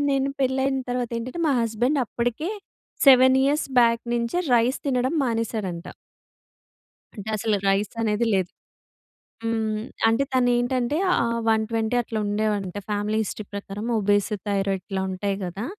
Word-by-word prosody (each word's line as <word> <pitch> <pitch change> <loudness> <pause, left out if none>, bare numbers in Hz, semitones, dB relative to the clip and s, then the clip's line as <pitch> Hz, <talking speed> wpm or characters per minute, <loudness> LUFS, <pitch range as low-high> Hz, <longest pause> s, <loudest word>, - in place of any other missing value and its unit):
నేను 275 0 +1
పెళ్లి 265 0 +1
అయిన 270 -1 0
తర్వాత 245 -1 -2
ఏంటంటే 255 +8 -6
మా - - +3
హస్బేండ్ 235 +6 0
అప్పటికే 245 - -2 0.6
7 260 0 +7
ఇయర్స్ 290 +2 +1
బ్యాక్ 230 -1 +4
నించే 235 +9 -1 0.2
రైస్ 240 +3 +2
తినడం 255 0 +1
మానేసాడంట. 220 -7 -2 1.3
అంటే 210 -1 -7
అసలు 215 0 0
రైస్ 195 +2 0
అనేది 220 +1 +1
లేదు. 185 -2 0 0.9
హ్మ్, 220 -1 -1 0.2
అంటే 225 +4 +3
తను 250 -1 +3
ఏంటంటే 245 +3 0
ఆ - - +4 0.4
120 220 +1 0
అట్లా 225 -2 -4
ఉండేవంట. 205 -2 -1
ఫ్యామిలీ 210 +1 -1
హిస్టరీ 215 0 -6
ప్రకారం 200 +1 -6
ఒబేసి, 205 +1 +1
థైరాయిడ్ 195 -2 0
ఇట్లా 190 -1 -2
ఉంటాయి 195 +1 -2
గదా! 195 +6 -5
225 Hz, 135 wpm, -24 LUFS, 205-250 Hz, 1.3 s, 7